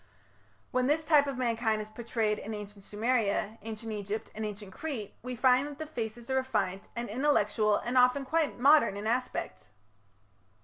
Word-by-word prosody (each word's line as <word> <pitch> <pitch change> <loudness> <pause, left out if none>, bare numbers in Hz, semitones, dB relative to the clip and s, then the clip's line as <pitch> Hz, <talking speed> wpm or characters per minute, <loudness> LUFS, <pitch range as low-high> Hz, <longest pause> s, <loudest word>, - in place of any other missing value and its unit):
When 255 -1 +1
this 310 +2 +2
type 295 -2 +5
of 275 -2 -3
mankind 230 -3 +1
is 210 - -5
portrayed 220 -1 -1
in 220 +1 -5
Ancient 205 -1 -9
Sumeria, 220 -1 0
Ancient 225 0 -6
Egypt, 210 +1 -4
and 220 - -5
Ancient 205 -2 -6
Crete 240 -9 -5
we 250 +1 -5
find 255 +3 +4
that 290 -1 -8
the 315 - -5
faces 235 -5 -5
are 265 - +2
refined 195 -7 -1
and 235 0 -3
intellectual 215 -4 +2
and 240 +4 -2
often 250 +2 +4
quite 315 +1 0
modern 275 -5 +5
in 205 - -5
aspect. 250 +3 -2
230 Hz, 170 wpm, -30 LUFS, 210-260 Hz, -, type